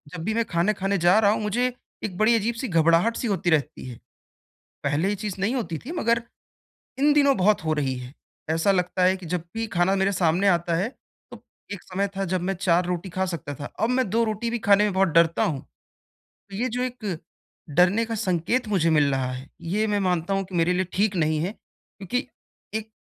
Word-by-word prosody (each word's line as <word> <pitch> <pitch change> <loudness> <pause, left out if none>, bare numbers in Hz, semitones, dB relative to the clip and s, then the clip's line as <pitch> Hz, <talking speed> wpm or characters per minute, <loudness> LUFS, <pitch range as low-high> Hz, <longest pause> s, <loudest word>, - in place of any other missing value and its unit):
जब 160 - -6
भी 215 +3 -1
मैं 230 0 +1
खाने 175 +5 +1
खाने 195 0 -1
जा 175 +3 +4
रहा 205 -1 +4
हूँ, 215 - -1
मुझे 245 +4 0 0.3
एक 185 -4 -4
बड़ी 220 +2 +4
अजीब-सी 230 +3 -1
घबराहट-सी 170 +8 +2
होती 185 -4 0
रहती 150 -6 0
है। 120 - -10 0.9
पहले 150 +7 +1
ये 205 - 0
चीज 200 -3 -3
नहीं 220 +7 0
होती 170 -11 -3
थी, 290 +8 -8
मगर 235 -8 +1 0.8
इन 290 +2 +4
दिनों 280 -2 +4
बहुत 195 -2 +2
हो 155 - +1
रही 140 -4 0
है। 125 +1 -9 0.4
ऐसा 165 +5 +2
लगता 180 0 0
है 185 +1 +4
कि 185 -3 -11
जब 175 0 -2
भी 225 0 -2
खाना 175 +1 +2
मेरे 195 +1 +1
सामने 180 +2 +2
आता 170 -1 +2
है, 195 +6 0 0.4
तो - - -12 0.3
एक 205 - -7
समय 195 +2 -2
था, 195 - -1
जब 185 0 -1
मैं 190 +2 -1
4 175 -1 +1
रोटी 180 +1 -3
खा 190 +2 -1
सकता 150 -5 -5
था, 145 - -8 0.2
अब 225 - +2
मैं 255 -4 +1
2 230 +2 +2
रोटी 220 +2 -2
भी 240 - -1
खाने 205 0 +4
में 205 - 0
बहुत 190 0 +3
डरता 165 +4 +3
हूँ। 150 -9 -2 0.9
ये 240 +6 -1
जो 250 +2 -2
एक 220 -9 -4 0.6
डरने 185 +7 +4
का 225 - -3
संकेत 210 +4 0
मुझे 170 -5 +2
मिल 150 -3 +3
रहा 130 -1 -1
है, 130 +2 -8
ये 210 +6 -1
मैं 205 -1 0
मानता 180 +2 0
हूँ 195 0 0
कि 185 0 -12
मेरे 170 +1 +2
लिए 185 +1 +1
ठीक 200 0 +1
नहीं 155 -1 +1
है 185 +5 -2
क्योंकि 230 +3 -7 0.5
एक 220 0 -4
190 Hz, 215 wpm, -24 LUFS, 170-220 Hz, 0.9 s, जा